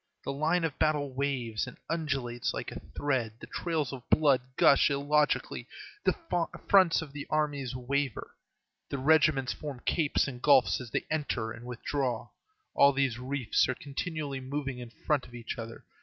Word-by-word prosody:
The -, -, -3 dB
line 160 Hz, +5 st, +1 dB
of 160 Hz, -3 st, -2 dB
battle 150 Hz, -3 st, +1 dB
waves 130 Hz, -5 st, -1 dB
and -, -, -10 dB
undulates 140 Hz, -7 st, -2 dB
like -, -, -4 dB
a -, -, -6 dB
thread, 130 Hz, -6 st, -2 dB
the -, -, -8 dB
trails 160 Hz, -6 st, -2 dB
of 125 Hz, -2 st, -9 dB
blood 140 Hz, -5 st, +4 dB, 0.2 s
gush 140 Hz, -, +6 dB
illogically, 145 Hz, +1 st, +1 dB, 0.4 s
the -, -, +3 dB, 0.5 s
fronts 185 Hz, -5 st, +5 dB
of 145 Hz, -3 st, -11 dB
the 145 Hz, -1 st, -6 dB
armies 145 Hz, -4 st, -1 dB
waver, 130 Hz, 0 st, -2 dB, 0.5 s
the 140 Hz, -, -2 dB
regiments 140 Hz, -2 st, +3 dB
form 145 Hz, -5 st, -7 dB
capes 155 Hz, -4 st, +2 dB
and 125 Hz, -2 st, -7 dB
gulfs 135 Hz, -3 st, +5 dB
as 125 Hz, -, -8 dB
they -, -, -2 dB
enter 130 Hz, -8 st, -1 dB
and 120 Hz, +2 st, -9 dB
withdraw; 125 Hz, -1 st, -2 dB, 0.4 s
all 140 Hz, 0 st, +6 dB
these 135 Hz, -4 st, 0 dB
reefs 130 Hz, -2 st, +1 dB
are 130 Hz, -, 0 dB
continually 145 Hz, 0 st, -4 dB
moving 135 Hz, -1 st, -4 dB
in 120 Hz, -1 st, -7 dB
front 130 Hz, +5 st, -1 dB
of 120 Hz, -, -13 dB
each 120 Hz, 0 st, -5 dB
other. 115 Hz, 0 st, -8 dB
140 Hz, 165 wpm, -30 LUFS, 125-150 Hz, 0.5 s, gush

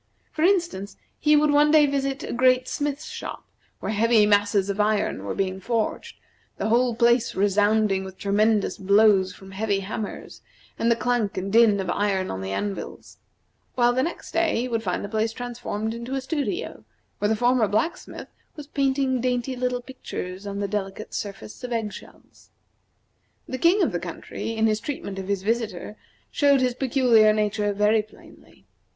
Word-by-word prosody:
For 310 Hz, -, -5 dB
instance, 340 Hz, -, +1 dB, 0.2 s
he 300 Hz, 0 st, +4 dB
would 300 Hz, 0 st, +4 dB
one 295 Hz, +1 st, +5 dB
day 305 Hz, -1 st, +6 dB
visit 275 Hz, 0 st, -2 dB
a -, -, -5 dB
great 255 Hz, +1 st, +3 dB
smith's 290 Hz, 0 st, -3 dB
shop, -, -, -7 dB, 0.3 s
where -, -, -3 dB
heavy 220 Hz, 0 st, +4 dB
masses 205 Hz, -1 st, +2 dB
of 200 Hz, +1 st, -3 dB
iron 210 Hz, -, +1 dB
were 100 Hz, -, -3 dB
being 190 Hz, -1 st, -2 dB
forged, 225 Hz, +2 st, -2 dB, 0.4 s
the 215 Hz, -, -2 dB
whole 240 Hz, +1 st, +2 dB
place 235 Hz, 0 st, +2 dB
resounding 205 Hz, 0 st, +2 dB
with 190 Hz, -1 st, -9 dB
tremendous 210 Hz, +1 st, +1 dB
blows 200 Hz, -1 st, +4 dB
from 190 Hz, -1 st, -13 dB
heavy 200 Hz, 0 st, -1 dB
hammers, 210 Hz, +2 st, -6 dB, 0.4 s
and 230 Hz, -, +2 dB
the 235 Hz, -, +4 dB
clank 235 Hz, -4 st, -1 dB
and 195 Hz, +2 st, -3 dB
din 225 Hz, -3 st, +5 dB
of 190 Hz, -, -3 dB
iron 195 Hz, -1 st, 0 dB
on 95 Hz, -, -5 dB
the 95 Hz, 0 st, -4 dB
anvils; 200 Hz, -, -5 dB, 0.6 s
while 245 Hz, -1 st, +3 dB
the 255 Hz, -, +1 dB
next 335 Hz, +6 st, -4 dB
day 330 Hz, -7 st, +1 dB
he 250 Hz, -, -2 dB
would 230 Hz, -2 st, -1 dB
find 185 Hz, -2 st, -2 dB
the -, -, -5 dB
place 220 Hz, +1 st, -1 dB
transformed 230 Hz, -3 st, -4 dB
into 235 Hz, +3 st, -5 dB
a 270 Hz, -, -2 dB
studio, 320 Hz, -, -3 dB, 0.4 s
where 205 Hz, -, +1 dB
the 220 Hz, -, +2 dB
former 240 Hz, 0 st, +2 dB
blacksmith 320 Hz, -, -3 dB, 0.3 s
was 295 Hz, -3 st, -8 dB
painting 270 Hz, -3 st, 0 dB
dainty 250 Hz, +1 st, -1 dB
little 250 Hz, 0 st, -2 dB
pictures 200 Hz, -7 st, -7 dB
on 200 Hz, 0 st, -4 dB
the 200 Hz, -, -1 dB
delicate 200 Hz, 0 st, -5 dB
surface 195 Hz, -, -7 dB
of 250 Hz, -, -5 dB
egg 225 Hz, -3 st, -2 dB
shells. -, -, -15 dB, 1.0 s
The 260 Hz, -, -5 dB
king 355 Hz, +7 st, +4 dB
of -, -, +1 dB
the -, -, -2 dB
country, 225 Hz, -, -6 dB
in 220 Hz, 0 st, +2 dB
his 215 Hz, -1 st, +2 dB
treatment 210 Hz, -8 st, -5 dB
of 190 Hz, -, -6 dB
his 200 Hz, -2 st, -1 dB
visitor, 215 Hz, -3 st, -2 dB, 0.4 s
showed 280 Hz, -2 st, +4 dB
his 250 Hz, -1 st, +1 dB
peculiar 240 Hz, -4 st, +4 dB
nature 210 Hz, -1 st, 0 dB
very 210 Hz, +2 st, +3 dB
plainly. 215 Hz, -, -19 dB
220 Hz, 175 wpm, -24 LUFS, 205-255 Hz, 1.0 s, day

